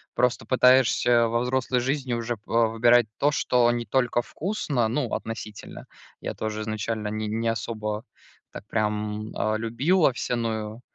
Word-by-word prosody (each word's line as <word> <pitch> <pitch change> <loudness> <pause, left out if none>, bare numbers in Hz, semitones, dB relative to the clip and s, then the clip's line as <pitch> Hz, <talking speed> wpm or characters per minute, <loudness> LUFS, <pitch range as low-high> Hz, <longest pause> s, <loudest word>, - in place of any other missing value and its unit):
просто 125 -2 +1
пытаешься 125 -1 +4
во 115 - +1
взрослой 125 0 0
жизни 135 0 -1
уже, 115 0 -2
па 115 +2 +1
выбирать 120 +1 +4
то, 145 +1 +2
что 125 -3 +2
не 120 -1 -2
только 125 +1 +1
вкусно, 145 - -2
ну, 125 0 -2
относительно. 110 -2 -6 0.4
Я - - -4
тоже 110 0 -3
изначально 110 0 -3
ни 110 +1 -3
не 115 +2 -2
особо 110 -1 -3 0.5
так 105 - -10
прям, 105 0 -2
а, 110 0 0
любил 135 +11 +1
овсяную, 115 -2 -1
115 Hz, 145 wpm, -25 LUFS, 110-125 Hz, 0.5 s, пытаешься